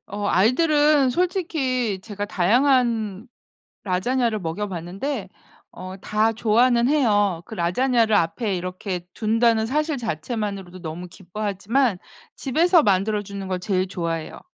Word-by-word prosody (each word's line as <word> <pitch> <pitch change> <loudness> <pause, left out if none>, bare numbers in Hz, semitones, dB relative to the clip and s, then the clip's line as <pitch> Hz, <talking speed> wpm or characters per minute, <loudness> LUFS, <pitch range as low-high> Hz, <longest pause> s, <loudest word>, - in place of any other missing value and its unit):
어 205 +1 -4
아이들은 290 - +3
솔직히 265 - -1
제가 205 -1 -5
다양한 225 0 +1 0.6
라자냐를 220 +4 0
먹여 180 +4 -3
봤는데 190 - -5 0.5
어 185 0 -8
다 215 +3 +1
좋아는 235 +2 +3
해요. 205 - +2
그 220 - -9
라자냐를 220 +5 +2
앞에 200 +4 0
이렇게 180 0 -5
둔다는 225 0 +2
사실 300 +4 -1
자체만으로도 200 -3 -4
너무 170 +2 -6
기뻐하지만 205 +5 -1 0.4
집에서 330 +5 +3
만들어 205 +1 +1
주는 200 -1 -7
걸 185 -1 -2
제일 185 -1 -1
좋아해요. 165 -4 -4
215 Hz, 295 characters per minute, -23 LUFS, 185-250 Hz, 0.6 s, 아이들은